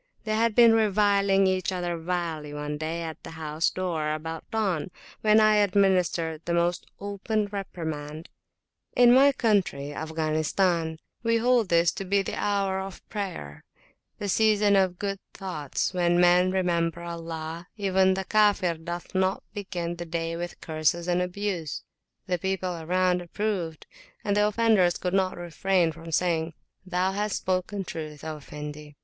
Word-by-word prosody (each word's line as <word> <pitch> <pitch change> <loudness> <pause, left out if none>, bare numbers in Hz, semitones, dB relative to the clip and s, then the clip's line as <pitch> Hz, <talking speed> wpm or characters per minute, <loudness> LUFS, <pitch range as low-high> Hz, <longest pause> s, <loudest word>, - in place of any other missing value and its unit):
They 215 - -2
had 225 0 +2
been 235 -2 +7
reviling 200 -2 +3
each 185 0 +1
other 175 -2 -2
vilely 165 -3 -3
one 150 0 -4
day 165 +2 -3
at 160 -1 -7
the - - -9
house 155 0 0
door 165 -5 -2
about 160 +1 -7
dawn, 195 -8 -1 0.3
when 215 0 +5
I 215 -1 +5
administered 185 -5 +2
the 170 - 0
most 170 +1 0
open 205 +2 -2
reprimand: 160 -6 -5 0.7
In 245 -1 +7
my 275 +2 +7
country 195 - 0
(Afghanistan) 160 +2 0 0.2
we 230 0 +2
hold 240 -3 +2
this 170 0 +4
to - - -5
be 195 +1 +1
the - - -5
hour 195 -2 0
of 190 -1 -8
prayer, 180 - -5 0.5
the 205 - -4
season 210 0 +3
of 190 -2 +2
good 195 0 -3 0.2
thoughts, 180 -6 -3
when 175 -1 +2
men 180 +1 +5
remember 170 -2 0
Allah; 165 0 -6
even 190 -2 +3
the 190 0 -3
Kafir 205 -5 +3
doth 170 +1 -6
not 190 0 +1
begin 175 -4 -4
the 175 - -5
day 165 0 -2
with 175 +1 -6
curses 160 +2 0
and 175 0 +2
abuse. 180 -4 -3 0.4
The 180 -2 -1
people 190 -1 -2
around 180 +2 +1
approved, 175 -3 -3 0.4
and 205 -1 +1
the 210 0 +4
offenders 210 -5 +3
could 180 0 -3
not 190 -1 +1
refrain 175 0 +1
from 165 +1 -10
saying, 165 -1 0 0.3
Thou 185 +1 +1
hast 205 +1 -1
spoken 185 +2 -2
truth, 155 -4 -7
O 155 -1 -5
Effendi! 150 0 -9
180 Hz, 155 wpm, -26 LUFS, 165-200 Hz, 0.7 s, been